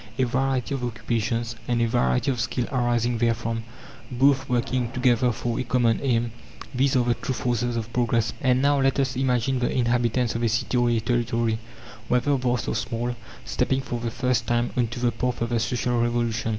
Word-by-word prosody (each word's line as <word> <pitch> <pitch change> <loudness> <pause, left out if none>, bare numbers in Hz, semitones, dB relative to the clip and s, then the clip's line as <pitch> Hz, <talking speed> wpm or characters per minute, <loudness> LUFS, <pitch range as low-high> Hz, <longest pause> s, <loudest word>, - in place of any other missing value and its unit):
A 130 - +2
variety 130 +1 0
of 135 -2 -3
occupations, 115 0 -2
and 120 -1 +1
a 115 - +3
variety 65 - +1
of 125 - -3
skill 120 +2 -1
arising 120 -2 +1
therefrom, 115 -1 0 0.5
both 135 +2 +2
working 125 0 0
together 125 -1 +2
for 120 +1 -3
a - - 0
common 120 -2 +2
aim 120 -3 +1 0.4
these 135 +1 +2
are 125 - +4
the 120 - +3
true 130 +2 -4
forces 120 0 -1
of 115 0 -5
progress. 115 -3 +1
And 130 -1 +2
now 140 0 +3
let 135 +1 +2
us 135 -1 0
imagine 130 0 +1
the 125 - 0
inhabitants 120 0 +1
of 115 - -3
a 115 - +2
city 115 +3 -1
or 120 -1 +3
a 115 -1 +2
territory 115 -1 0 0.5
whether 125 +4 +2
vast 125 -2 -1
or - - 0
small 120 +1 -2 0.3
stepping 130 0 0
for 120 -2 -4
the 115 0 -2
first 120 0 0
time 120 0 +1
on 120 -2 +2
to 120 +2 -6
the 120 -1 +2
path 125 0 -2
of 115 - -1
the 120 -1 +1
Social 120 +1 0
Revolution. 120 -1 0
120 Hz, 200 wpm, -25 LUFS, 115-125 Hz, 0.5 s, are